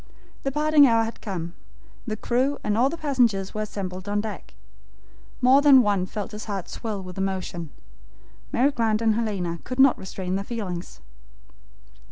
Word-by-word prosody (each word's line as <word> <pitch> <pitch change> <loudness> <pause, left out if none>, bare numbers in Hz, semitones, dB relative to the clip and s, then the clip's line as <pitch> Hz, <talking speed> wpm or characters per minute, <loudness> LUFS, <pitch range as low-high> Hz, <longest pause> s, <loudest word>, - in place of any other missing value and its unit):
The 275 - -2
parting 300 0 +5
hour 230 -2 +3
had 225 +1 -6
come. 175 -5 -5 0.5
The 215 -1 -2
crew 255 +6 0
and 210 -1 0
all 250 +4 +3
the 335 - -5
passengers 245 -11 +1
were 215 - -3
assembled 195 -2 -5
on 205 0 +1
deck. 215 0 -7 0.9
More 260 +3 +6
than 275 -3 +7
one 200 -3 +1
felt 210 +1 -5
his 210 0 -7
heart 200 -4 -4
swell 210 -4 -5
with 185 +1 -8
emotion. 185 -4 -3 0.8
Mary 265 +4 +3
Grant 225 -3 0
and 220 -1 +3
Lady 230 0 0 0.2
Helena 170 -1 -3
could 255 +1 -6
not 270 -1 +6
restrain 190 0 -4
their 195 - -3
feelings. 195 -6 -6
215 Hz, 170 wpm, -25 LUFS, 190-250 Hz, 0.9 s, than